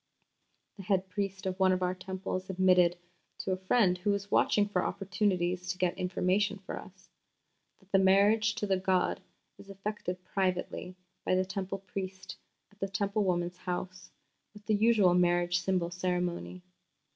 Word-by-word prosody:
The 195 - -8
head 190 -1 0
priest 195 0 -3
of 185 0 -3
one 190 -1 +5
of 185 0 +1
our 180 0 +1
Temples 185 0 -5
admitted 180 -2 +4 0.4
to 190 - -3
a - - +2
friend 185 -1 +2
who 195 - -1
was 200 0 -1
watching 205 -1 +3
for 185 -3 0
opportunities 180 -2 -1
to 180 +1 -2
get 180 -1 +1
information 190 +2 0
for 195 - -7
us 190 0 -15 0.7
that 190 0 -27
the 195 - +5
"marriage 205 +3 +4
to - - -2
the 195 -2 +1
god 185 -1 +1 0.4
is 200 - -14
effected 195 -2 -5
privately 185 -1 -2 0.3
by - - +2
the 185 0 +2
Temple 190 0 -4
priest 190 -1 -7 0.4
at 205 - -25
the 195 - -1
Temple 200 +2 0
woman's 175 -1 -1
house, 185 0 -5 0.5
with 210 0 -14
the 215 - +1
usual 210 -4 +4
marriage 175 0 +3
symbol 180 -2 0
ceremony. 180 0 -2
185 Hz, 160 wpm, -30 LUFS, 180-195 Hz, 0.7 s, one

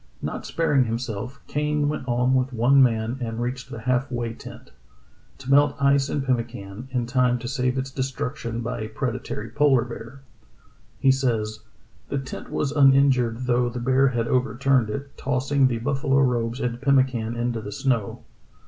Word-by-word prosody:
Not - - -5
sparing 145 -6 +2
himself, 115 +2 -4
Kane 150 0 0
went 145 -3 -3
on 125 +1 +2
with 130 0 +1
one 125 +4 +4
man 115 0 +1
and 115 -1 -3
reached 125 +1 -4
the 115 - -7
half 125 +2 0
way 120 -2 -2
tent, - - -12 0.7
to 135 0 -6
melt 145 +1 +5
ice 140 0 +3
and 140 -2 -2
pemmican, 115 -3 -3
in 125 -2 -1
time 125 0 +2
to 120 - -7
save 125 +1 -1
its 135 +1 -3
destruction 125 -3 -3
by 120 0 -4
a 110 - -4
predatory 120 -2 -4
polar 135 -2 +3
bear. 120 +2 -9 0.8
He 135 - +5
says: 115 -5 -1 0.5
"The 140 - -1
tent 135 -1 -6
was 140 - -1
uninjured 135 -4 +4
though 120 0 +2
the 120 +1 -5
bear 130 +2 +3
had 120 -3 -1
overturned 130 -1 +1
it, 140 +5 -6
tossing 135 +1 +2
the 120 -2 -1
buffalo 135 +3 0
robes 120 -2 +1
and 120 -1 -3
pemmican 130 -5 +2
into 120 -1 -2
the 105 - -7
snow. 125 -2 -1
125 Hz, 165 wpm, -24 LUFS, 120-135 Hz, 0.8 s, melt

